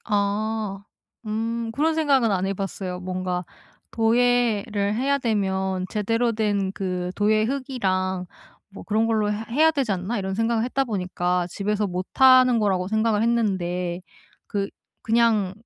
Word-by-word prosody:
아. 205 -1 -1 0.4
음 225 +2 -2
그런 310 +6 +1
생각은 280 -7 +3
안 190 -1 0
해 195 - -1
봤어요. 190 -2 -4
뭔가 180 -1 -3 0.5
도예를 225 -3 +1
해야 275 +5 +1
되면 190 -5 -1
'제대로 230 +3 0
된 205 -3 0
그 180 -2 -3
도예 215 +1 +2
흙이랑 190 -8 -1 0.4
뭐 195 - -10
그런 220 +1 +1
걸로 215 -2 +1
해 210 - -1
해야 310 +6 +4
되지 275 -9 -1
않나?' 190 +5 -2
이런 190 -1 -3
생각을 225 +1 +1
했다 270 +2 0
보니까 180 -5 -1
집에서 210 +2 -1
못 180 0 -4
하는 255 -2 +6
거라고 190 -4 0
생각을 220 0 +1
했는데 180 -6 0 0.5
그 200 -1 -2 0.3
그냥 225 -4 +2
210 Hz, 270 characters per minute, -24 LUFS, 190-230 Hz, 0.5 s, 하는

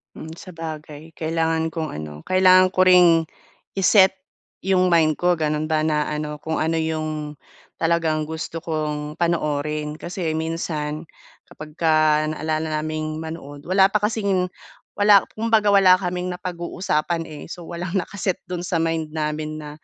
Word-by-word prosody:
Mm, 160 +1 -8
sabagay 160 -3 -9
kailangan 160 0 -1
kong 160 -1 -4
ano, 75 0 -8
kailangan 185 0 +5
ko 185 - +4
ring 180 -3 +6 0.6
i-set 190 0 +6 0.5
yung 185 -1 +2
mind 160 -2 +4
ko 175 +2 +1
ganun 155 0 -1
ba 155 0 +2
na 150 -1 0
ano 150 0 -3
kung 160 0 -2
ano 160 +1 0
yung, 155 -2 -3 0.4
talagang 160 -2 +1
gusto 160 +1 -5
kong 150 -2 -3
panoorin. 150 -2 -1
Kasi 170 -2 -3
minsan, 160 -1 -3 0.4
kapagka 155 0 +1
naalala 155 0 -2
naming 155 0 -3
manood, 155 -3 -8
wala 190 +2 +4
pa 210 +1 0
kasing 200 -4 0 0.4
wala 205 -1 +5
kumbaga 220 -2 +2
wala 190 -2 +7
kaming 180 -1 -3
napag-uusapan, 175 -2 -2
eh. 155 -2 -9
So, 175 0 -8
walang 175 +2 -5
naka-set 190 0 -1
do'n 180 -1 -5
sa 180 0 -2
mind 160 -1 -1
namin 155 0 -2
na 150 -1 -8
160 Hz, 140 wpm, -22 LUFS, 155-180 Hz, 0.6 s, wala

